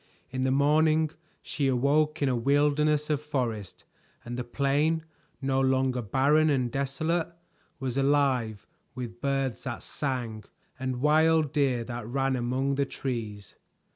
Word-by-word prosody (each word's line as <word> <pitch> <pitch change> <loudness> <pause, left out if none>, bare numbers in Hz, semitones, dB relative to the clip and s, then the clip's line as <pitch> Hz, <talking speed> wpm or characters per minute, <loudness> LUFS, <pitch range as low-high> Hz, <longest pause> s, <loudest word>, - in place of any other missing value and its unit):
In 130 0 -1
the - - +2
morning 155 +3 +3 0.3
she 140 -2 -1
awoke 145 +4 +2
in - - +3
a 130 - +1
wilderness 145 +4 +2
of 150 -1 0
forest, 120 -10 -3 0.4
and 120 0 -5
the 125 - -3
plain, 145 +6 +1 0.4
no 135 0 +1
longer 130 -1 +1
barren 140 +8 +3
and 130 -4 +1
desolate, 155 +5 -1 0.5
was 130 0 -2
alive 135 -7 +1 0.3
with 120 -1 -7
birds 135 -3 -1
that 125 -3 -4
sang, 120 -6 -3 0.3
and 130 -1 -3
wild 155 0 +3
deer 135 -5 +1
that 120 -2 -6
ran 135 +2 0
among 130 +3 0
the 140 0 +1
trees. 110 -8 -5
135 Hz, 140 wpm, -28 LUFS, 125-150 Hz, 0.5 s, morning